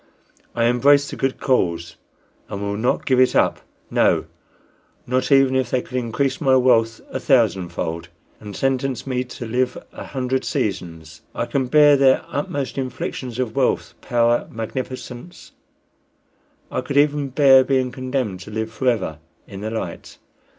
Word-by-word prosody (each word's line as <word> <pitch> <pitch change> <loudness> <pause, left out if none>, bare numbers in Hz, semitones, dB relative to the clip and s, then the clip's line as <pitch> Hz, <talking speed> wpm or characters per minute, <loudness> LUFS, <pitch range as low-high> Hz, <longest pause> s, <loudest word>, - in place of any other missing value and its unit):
I 115 - +1
embrace 140 +4 +4
the - - -5
good 135 0 -2
cause, 85 -9 0 0.5
and 100 - -5
will 100 0 -3
not 115 +5 0
give 130 -2 +2
it 130 - +4
up - - +2 0.3
no, - - +2 0.8
not 130 +1 -1
even 135 -1 +5
if 130 -2 +1
they 125 0 0
could - - -10
increase 125 +3 -1
my 135 -3 +4
wealth 115 -3 +3
a 130 - -3
thousand 110 - +2
fold, 85 0 -4 0.3
and 105 -2 -9
sentence 135 -1 -1
me 130 -2 -1
to 125 -1 -8
live 125 +2 -1 0.2
a - - -8
hundred 130 -1 -2
seasons. 85 -5 -4
I 120 - -1
can 130 0 -1
bear 145 +2 +6
their 135 -1 +4
utmost 140 -1 -3
inflictions 130 -1 -5
of 125 -3 -2
wealth, 135 -2 0
power, 120 0 +1
magnificence; 125 +6 -7 1.2
I - - -1
could 140 +2 -3
even 145 -1 +3
bear 135 -1 +6
being 130 -1 0
condemned 130 -7 -3
to 100 - -10
live 110 +1 -4
forever 115 - -1 0.3
in 100 0 -9
the 110 - -3
light. 110 0 -6
125 Hz, 155 wpm, -21 LUFS, 110-135 Hz, 1.2 s, bear